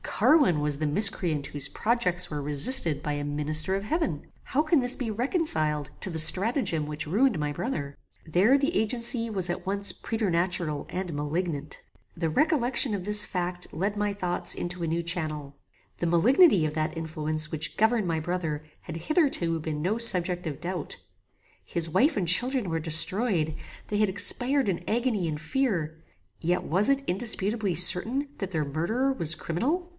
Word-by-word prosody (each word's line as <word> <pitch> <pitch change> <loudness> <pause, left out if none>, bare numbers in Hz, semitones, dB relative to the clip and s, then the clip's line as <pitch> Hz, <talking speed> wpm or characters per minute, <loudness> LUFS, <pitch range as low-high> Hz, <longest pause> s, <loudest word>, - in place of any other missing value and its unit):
Carwin 280 - +2
was 150 -1 -1
the 155 - -2
miscreant 155 -4 -1
whose 145 -1 -5
projects 180 -6 -1
were 150 -1 -5
resisted 150 - +7
by 150 0 -3
a 145 0 -4
minister 150 +5 0
of 195 - -4
heaven. 210 - -3 0.2
How 285 - -1
can 310 0 +2
this 245 0 0
be 245 -4 -4
reconciled 210 - -1
to 190 - -5
the 160 - -4
stratagem 185 - +1
which 150 0 -6
ruined 215 - +1
my 150 -1 -2
brother? 145 - -5 0.3
There 195 - +3
the 290 +6 -1
agency 230 +1 +1
was 190 -3 -3
at 175 - -4
once 200 +1 +2
preternatural 175 -7 -2
and 180 -2 -5
malignant. 150 0 -4 0.3
The 165 -1 -2
recollection 260 - +1
of 195 -3 -4
this 210 0 +2
fact 180 -1 -3
led 200 +6 -3
my 205 0 -1
thoughts 180 -3 +1
into 175 0 -4
a - - -2
new 165 +2 -1
channel. 155 -4 -4 0.4
The - - -3
malignity 205 - +4
of 155 0 -4
that 155 +1 -2
influence 155 -1 -2
which 155 -1 -3
governed 220 -2 +1
my 165 -1 -1
brother 160 -2 -4 0.2
had 160 - -8
hitherto 175 - 0
been 155 -1 -5
no 205 +6 -1
subject 180 -6 +3
of 150 -4 -6
doubt. 175 -2 -5 0.7
His 165 -1 -4
wife 275 - +2
and 185 -4 -1
children 245 +3 +3
were 165 0 -2
destroyed; 165 +1 +2 0.3
they 210 - -2
had 210 -1 +2
expired 245 +6 +1
in 175 -2 -3
agony 225 -5 -1
and 150 -1 -5
fear; 165 - -2 0.4
yet 175 +2 -1
was 190 - +2
it 275 0 +1
indisputably 205 0 +2
certain 220 - +2
that 195 -2 -5
their 155 -4 -2
murderer 220 - -1
was 170 -9 -1
criminal? 255 - -3
180 Hz, 170 wpm, -26 LUFS, 155-225 Hz, 0.7 s, resisted